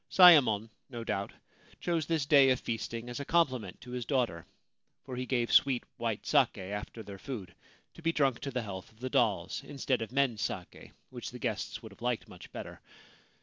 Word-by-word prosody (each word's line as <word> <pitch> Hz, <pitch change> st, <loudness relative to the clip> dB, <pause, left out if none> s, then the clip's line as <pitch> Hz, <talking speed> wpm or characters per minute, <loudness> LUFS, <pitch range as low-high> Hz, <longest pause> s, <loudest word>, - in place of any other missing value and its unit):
Sayemon, 125 Hz, -, +7 dB, 0.2 s
no 120 Hz, -3 st, -6 dB
doubt, 100 Hz, -3 st, -2 dB, 0.5 s
chose 165 Hz, -4 st, -1 dB
this 160 Hz, -4 st, +1 dB
day 140 Hz, -3 st, +7 dB
of 130 Hz, -1 st, +3 dB
feasting 115 Hz, +1 st, -4 dB
as 120 Hz, +2 st, -5 dB
a -, -, -3 dB
compliment 130 Hz, -, +1 dB
to 125 Hz, -, -10 dB
his 125 Hz, -1 st, -3 dB
daughter 120 Hz, -, -1 dB, 0.3 s
— -, -, -51 dB
for 130 Hz, -, -6 dB
he 125 Hz, 0 st, -3 dB
gave 120 Hz, -3 st, 0 dB
sweet 135 Hz, -4 st, +5 dB
white 115 Hz, -3 st, -2 dB
sake 140 Hz, -7 st, +3 dB
after 105 Hz, +3 st, -6 dB
their 100 Hz, -1 st, -9 dB
food, 100 Hz, -10 st, -6 dB, 0.4 s
to -, -, -13 dB
be 165 Hz, 0 st, +2 dB
drunk 135 Hz, -6 st, +2 dB
to 140 Hz, -, -4 dB
the 125 Hz, -2 st, -2 dB
health 95 Hz, -3 st, -7 dB
of 110 Hz, -, -25 dB
the 130 Hz, +1 st, -4 dB
dolls, 100 Hz, -4 st, +1 dB
instead 135 Hz, -3 st, -1 dB
of 110 Hz, -1 st, -4 dB
men's 130 Hz, -5 st, +1 dB
sake, -, -, -5 dB, 0.2 s
which 120 Hz, -2 st, -6 dB
the 125 Hz, -, -9 dB
guests 115 Hz, -3 st, -3 dB
would 110 Hz, -, -9 dB
have 100 Hz, -, -17 dB
liked 120 Hz, -1 st, -1 dB
much -, -, -12 dB
better. -, -, -8 dB
120 Hz, 200 wpm, -31 LUFS, 110-135 Hz, 0.5 s, Sayemon